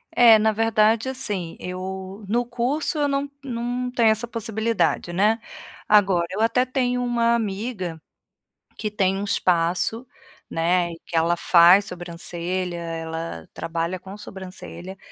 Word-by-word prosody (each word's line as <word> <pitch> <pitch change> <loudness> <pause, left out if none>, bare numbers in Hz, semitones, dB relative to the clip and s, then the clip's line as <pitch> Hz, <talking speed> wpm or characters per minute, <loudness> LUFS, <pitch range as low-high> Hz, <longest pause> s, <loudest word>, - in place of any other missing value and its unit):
É, 230 -3 +8
na 220 0 +3
verdade 225 +2 +2
assim 205 -10 -1
eu 190 +2 -6
no 240 +3 +1
curso 265 +7 -1
eu 290 -1 +2
não 280 0 -1
não 245 0 -3
tenho 235 -3 +4
essa 225 +2 +1
possibilidade, 225 -5 -1
né. 215 +5 +3 0.5
Agora 195 -5 +4
eu 205 - -2
até 250 +3 +3
tenho 250 -1 0
uma 235 -1 +2
amiga, 195 -6 -3 0.8
que 215 - -2
tem 195 -2 +1
um 200 - -3
espaço, 185 +6 0 0.4
né, 170 +1 +1
e 165 - -10
que 170 - -7
ela 170 +1 +3
faz 175 +3 +6
sobrancelha, 175 0 -4
ela 165 - -5
trabalha 170 +2 -3
com 190 +2 -10
sobrancelha, 190 -1 -9
200 Hz, 135 wpm, -23 LUFS, 175-235 Hz, 0.8 s, É